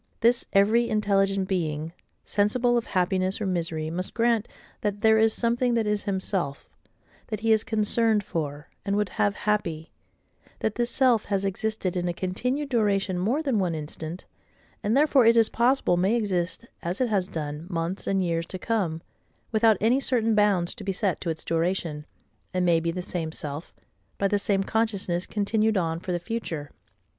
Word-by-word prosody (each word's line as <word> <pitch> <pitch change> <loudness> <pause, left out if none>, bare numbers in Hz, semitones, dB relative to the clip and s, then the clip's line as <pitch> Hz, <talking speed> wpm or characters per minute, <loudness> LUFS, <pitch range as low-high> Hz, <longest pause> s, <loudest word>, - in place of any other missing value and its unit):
This 235 +1 +3
every 220 +4 +4
intelligent 195 -2 +1
being, 160 -4 -2 0.3
sensible 240 +4 +2
of 235 - 0
happiness 185 +1 0
or 215 - -2
misery, 165 -4 -2
must 180 +2 -4
grant—that 220 -3 -1
there 220 0 +5
is 220 0 +5
something 240 +2 +1
that 225 -2 +1
is 210 -1 -1
HIMSELF, 190 -7 -2 0.6
that 215 -2 -4
he 225 0 +2
is 220 -1 +4
concerned 220 0 +2
for, 150 -4 -4 0.2
and 200 0 -1
would 210 -1 0
have 205 0 0
happy; 170 -7 -2 0.7
that 220 - -1
this 240 +1 -1
self 245 -3 +3
has 195 -1 -1
existed 195 -1 -2
in 175 0 -1
a 175 - -2
continued 250 +11 -2
duration 200 -6 +1
more 240 - 0
than 265 -8 +1
one 175 -4 0
instant, 155 +3 -6 0.6
and 215 +5 +1
therefore 285 -3 +5
it 230 +1 +5
is 225 -1 +5
possible 240 -6 +2
may 190 +6 +2
exist, 185 -3 -1 0.2
as 175 +3 -3
it 255 -2 +1
has 195 -4 +1
done, 150 0 -5
months 170 +1 -3
and 195 -1 +1
years 165 -1 -1
to 185 - -5
come, 180 -6 -1 0.5
without 220 -2 +4
any 235 +5 +3
certain 230 -4 +1
bounds 205 -5 +2
to 225 - -10
be 195 - -1
set 190 0 -1
to 175 - -3
its 160 -1 -4
duration; 165 -2 -1 0.5
and 180 0 +2
may 170 -2 +4
be 165 +1 -2
the 180 +2 -3
same 165 -3 -3
self, 150 0 -5 0.5
by 200 - +2
the 205 +1 +1
same 195 -1 +1
consciousness 200 -5 -1
continued 215 +1 +1
on 165 -2 -1
for 180 - -5
the 175 - +1
future. 175 -7 -5
200 Hz, 175 wpm, -26 LUFS, 175-225 Hz, 0.7 s, there